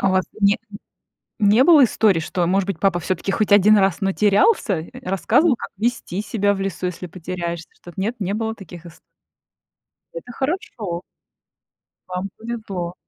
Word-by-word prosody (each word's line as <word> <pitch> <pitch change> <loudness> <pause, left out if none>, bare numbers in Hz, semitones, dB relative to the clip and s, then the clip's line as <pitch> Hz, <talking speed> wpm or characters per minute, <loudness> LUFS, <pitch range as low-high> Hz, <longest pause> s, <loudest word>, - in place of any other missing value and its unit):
А - - +2
у - - +1
вас 185 0 +2 0.2
не 200 0 +4 0.8
не 210 +5 +5
было 315 -4 +7
историй, 210 -7 +3
что, 175 +2 -1
может 195 +2 +1
быть, 185 -5 -3
папа 185 -2 +2
всё-таки 185 +3 -2
хоть 215 0 0
1 205 +1 +6
раз, 195 -2 +2
но 195 -1 0
терялся? 205 - +2
Рассказывал, 230 - +1
как - - -6
вести 210 -3 -2
себя 205 -1 0
в 195 - -4
лесу, 190 -2 -3
если 180 0 -4
потеряешься? 170 -1 -5
Что 175 - -14
т - - -22
нет, 220 +5 -1
не 195 -1 -2
было 225 +1 -2
таких 175 -4 -12
ист 170 0 -13 1.1
Это - - -8
хорошо. 235 - -3 1.1
Вам 185 +2 -4
повезло. 205 -7 -5
195 Hz, 165 wpm, -21 LUFS, 180-220 Hz, 1.1 s, было